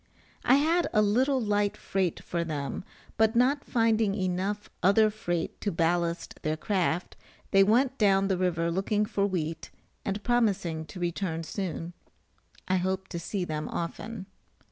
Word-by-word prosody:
I 255 - +6
had 325 +5 +3
a 215 - +5
little 260 +6 +2
light 205 -3 0
freight 190 -3 -1
for 170 -1 -2
them; 150 0 -4 0.3
but 220 +1 +3
not 265 +4 +3
finding 225 -4 +2
enough 190 +2 -2
other 210 +4 +5
freight 175 -6 -3
to 205 - 0
ballast 170 +1 0
their 155 0 -1
craft, 180 -1 -1 0.4
they 195 0 +6
went 250 +6 +2
down 195 -2 +4
the 190 - +1
river 170 -2 0
looking 205 +4 +1
for 200 -2 0
wheat, 165 -4 -3 0.3
and 200 +1 -3
promising 200 -10 +1
to 180 - -10
return 170 -1 -2
soon. 175 -1 -4 0.7
I 185 - +2
hope 190 +1 -2
to 170 - -4
see 180 +2 -3
them 155 -2 -3
often. 190 +4 -5
195 Hz, 150 wpm, -28 LUFS, 170-215 Hz, 0.7 s, I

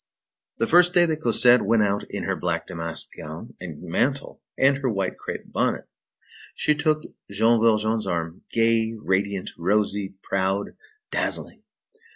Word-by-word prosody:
The - - +1
first 175 +5 +5
day 175 -1 +6
that 160 -2 -2
Cosette 125 -5 +5
went 115 -2 +3
out 100 0 0
in - - -4
her - - -1
black 85 -2 -2
damask 85 -2 -4
gown 80 +2 -9
and 85 -4 -8
mantle, 130 +11 -1 0.2
and 135 +1 +4
her 135 -2 0
white 95 -4 -1
crape - - -7
bonnet, - - 0 0.7
she 150 - +2
took 155 +1 +1 0.3
Jean 110 +3 +3
Valjean's 110 -1 +2
arm, 85 -1 -3
gay, 115 0 +2
radiant, 95 -1 -1
rosy, 100 +1 0
proud, 95 +1 -1 0.4
dazzling. - - -2
105 Hz, 145 wpm, -24 LUFS, 95-125 Hz, 0.7 s, day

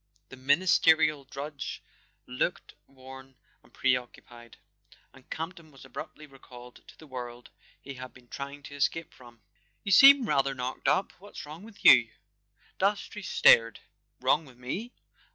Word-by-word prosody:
The - - -11
ministerial 155 +1 +3
drudge 140 +2 -7 0.4
looked 65 - -3
worn 130 0 -14 0.3
and - - -25
pre¬ 130 -1 +1
occupied, 120 -1 -17 0.6
and 135 - -20
Campton 165 0 -7
was 135 -2 -16
abruptly 155 +3 -9
recalled 125 -3 -15
to - - -16
the 160 - -15
world 120 -3 -9 0.3
he 140 - -10
had 130 -1 -10
been 125 -1 -20
trying 140 +3 -8
to 140 - -11
escape 165 +3 -2
from. 120 -3 -18 0.4
"You 200 - -3
seem 270 +5 +8
rather 140 -3 +1
knocked 125 0 -5
up—what's 195 -1 -2
wrong 155 +3 -10
with 210 0 -15
you?" - - +8 0.7
Dastrey 205 +1 -1
stared. 115 - +4 0.4
"Wrong 155 - +2
with 130 -5 -17
me? 180 - -6
140 Hz, 140 wpm, -28 LUFS, 125-160 Hz, 0.7 s, seem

